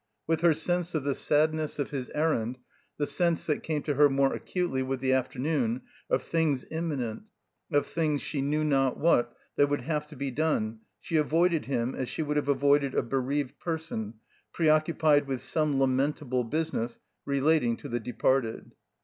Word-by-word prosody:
With 165 0 0
her 170 -2 +5
sense 175 +2 -1
of 155 - 0
the 140 0 +1
sadness 155 +2 +1
of 145 - -2
his 130 -4 -4
errand,, 130 -6 0 0.4
the 145 - 0
sense 170 +1 0
(that 150 - 0
came 150 -3 -2
to 150 - 0
her 145 +1 +5
more 135 0 +2
acutely 175 -8 -2
with 130 0 -2
the 130 0 +1
afternoon) 130 -1 0 0.3
of 130 - +1
things 155 -6 0
imminent, 145 -9 -2 0.5
of 145 -1 +3
things, 155 -3 0
she 145 - -2
knew 150 +3 0
not 135 -4 +2
what, 120 -7 +2 0.2
that 145 0 +4
would 145 - 0
have 150 -1 -2
to 150 - -12
be 140 0 -3
done, 120 -7 0 0.2
she 165 - -1
avoided 165 +2 +2
him 125 -2 -1
as 130 - -3
she 160 - -2
would 150 0 -1
have 145 -1 0
avoided 140 0 +3
a - - +2
bereaved 135 +2 -2
person 160 -10 -4 0.4
preoccupied 155 -1 +3
with 130 -2 -3
some 145 +1 0
lamentable 130 -1 +1
business 120 -4 -2 0.3
relating 140 -4 +2
to - - -8
the 120 -2 -2
departed. 125 0 0
145 Hz, 175 wpm, -28 LUFS, 130-155 Hz, 0.5 s, her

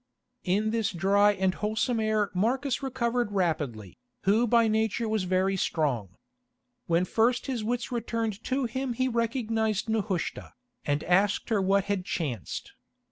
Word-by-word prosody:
In 205 +4 +1
this 225 -2 0
dry 200 +3 +3
and 190 -1 +1
wholesome 220 +3 -1
air 215 -2 +1
Marcus 250 +8 0
recovered 245 -4 -1
rapidly, 150 - -2 0.2
who 220 +5 +3
by 230 0 +4
nature 220 +1 0
was 215 -3 0
very 185 +1 +1
strong. 125 - -1 0.7
When 170 +2 +2
first 235 +5 +1
his 250 -5 -2
wits 235 +2 -2
returned 230 -3 -2
to 265 0 0
him 260 +2 -2
he 255 +2 0
recognised 225 -3 0
Nehushta, 210 -5 -2 0.3
and 145 +1 0
asked 195 +6 +2
her 215 -3 +2
what 195 +1 +3
had 200 -2 -1
chanced. 140 - -4
215 Hz, 140 wpm, -28 LUFS, 185-230 Hz, 0.7 s, by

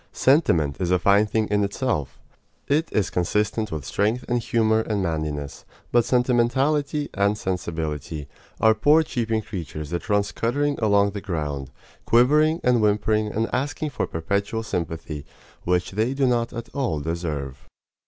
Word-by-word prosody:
Sentiment 85 - +3
is 90 -2 -1
a 90 - +4
fine 100 +3 +4
thing 110 0 0
in 105 0 +2
itself. 100 - -2 0.5
It 155 +4 +1
is 100 -3 0
consistent 105 +4 0
with 75 -4 -4
strength 110 - 0
and 120 0 +1
humor 110 -1 +2
and 105 -3 -1
manliness; 75 -4 -3 0.3
but 120 -1 +4
sentimentality 135 +4 +1
and 100 +1 +1
sensibility 80 -6 -4 0.3
are 110 0 +5
poor 145 +9 +4
cheeping 115 -6 -1
creatures 75 -6 -6
that 85 +4 -4
run 105 -1 +3
scuttering 140 +8 -1
along 100 -2 +3
the 100 0 -6
ground, 75 -8 -3 0.4
quivering 150 +7 +4
and 125 -2 +3
whimpering 105 +1 +2
and 110 +2 -1
asking 145 +3 -2
for - - -2
perpetual 100 +7 -2
sympathy, 80 -6 -4 0.4
which 90 0 +1
they 110 +7 0
do 135 -1 +2
not 120 -2 +1
at 115 -1 -7
all 130 - -1
deserve. 75 -4 -4
105 Hz, 150 wpm, -24 LUFS, 85-120 Hz, 0.5 s, are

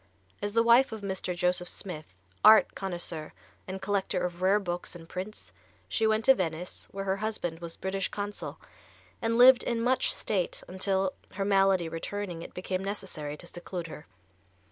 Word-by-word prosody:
As 205 0 -2
the 230 0 +4
wife 235 +3 +6
of 220 -1 -6
Mr. 190 -2 -3
Joseph 180 0 +1
Smith, 155 - -4 0.3
art 215 +1 +8
connoisseur 175 -4 -4 0.3
and 190 0 -4
collector 195 0 0
of 175 0 -5
rare 195 +3 +4
books 175 -2 -4
and 165 -1 -11
prints, 190 +5 -7 0.4
she 220 - +1
went 220 +1 +1
to 265 - +9
Venice, 175 -5 -4
where 195 0 -5
her 190 0 0
husband 195 -6 -3
was 170 -1 -6
British 190 0 -2
Consul, 205 0 -5 0.6
and 230 0 +1
lived 250 +1 +8
in 235 -1 -1
much 250 +3 +2
state 190 -5 -1
until, 190 0 0 0.2
her 195 0 -2
malady 195 -3 +3
returning, 175 +1 -4
it - - -10
became 185 +1 -3
necessary 185 -7 -5
to - - -5
seclude 175 0 -6
her. 155 -2 -9
190 Hz, 165 wpm, -29 LUFS, 175-205 Hz, 0.6 s, to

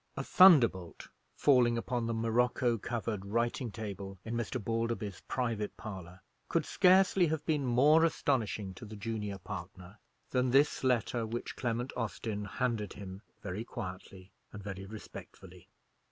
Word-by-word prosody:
A 135 - -2
thunderbolt 125 - +5 0.3
falling 125 -4 +4
upon 120 0 -2
the 115 - -1
morocco 120 +1 +1
covered 110 -3 -3
writing 115 +4 -1
table 100 -3 -6
in 115 - -4
Mr. 120 +2 -2
Balderby's 115 -2 -2
private 115 -5 -2
parlour 95 -4 -8 0.3
could - - +1
scarcely 185 -1 +4
have 155 -1 -2
been 150 -4 0
more 145 +7 +5
astonishing 110 - 0
to 95 - -10
the 110 +1 -9
junior 105 -2 -4
partner 90 +1 -9 0.3
than 125 0 +2
this 140 +3 +3
letter 120 -2 +1
which 120 +2 -5
Clement 120 +1 -2
Austin 110 -2 -3
handed 110 -1 -2
him 95 -1 -9 0.2
very 100 +3 -4
quietly 95 -4 -8 0.2
and 105 -2 -9
very 95 -1 -6
respectfully. 110 +1 -11
115 Hz, 140 wpm, -32 LUFS, 100-125 Hz, 0.3 s, thunderbolt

